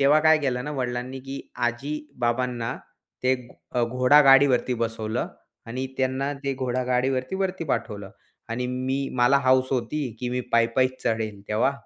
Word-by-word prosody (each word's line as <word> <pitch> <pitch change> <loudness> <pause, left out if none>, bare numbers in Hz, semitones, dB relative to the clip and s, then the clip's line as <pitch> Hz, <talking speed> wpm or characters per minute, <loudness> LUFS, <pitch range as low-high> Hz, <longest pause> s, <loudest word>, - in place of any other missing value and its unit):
तेव्हा 145 +2 +5
काय 155 0 +5
केलं 130 -4 -1
ना 150 - -4
वडिलांनी, 125 -1 -3
की 135 +1 -6 0.2
आजी-बाबांना 120 -2 -2 0.5
ते 130 0 +3
एक 125 -2 -4 0.2
अ, 125 - +1
घोडागाडीवरती 130 0 +5
बसवलं 115 -2 -2 0.4
आणि 130 +3 -3
त्यांना 130 +2 0
ते 140 - 0
घोडागाडीवरती 130 +2 0
वरती 190 -3 -2
पाठवलं. 105 -9 -3 0.4
आणि 120 +2 -2
मी 130 +2 -2
मला 125 +3 +5
हौस 130 0 +4
होती, 130 +2 -1
की 125 - -2
मी 125 0 -1
पायी-पायीच 125 +3 +2
चढेल 110 -3 -1
तेव्हा, 110 +5 +2
130 Hz, 140 wpm, -25 LUFS, 120-135 Hz, 0.5 s, तेव्हा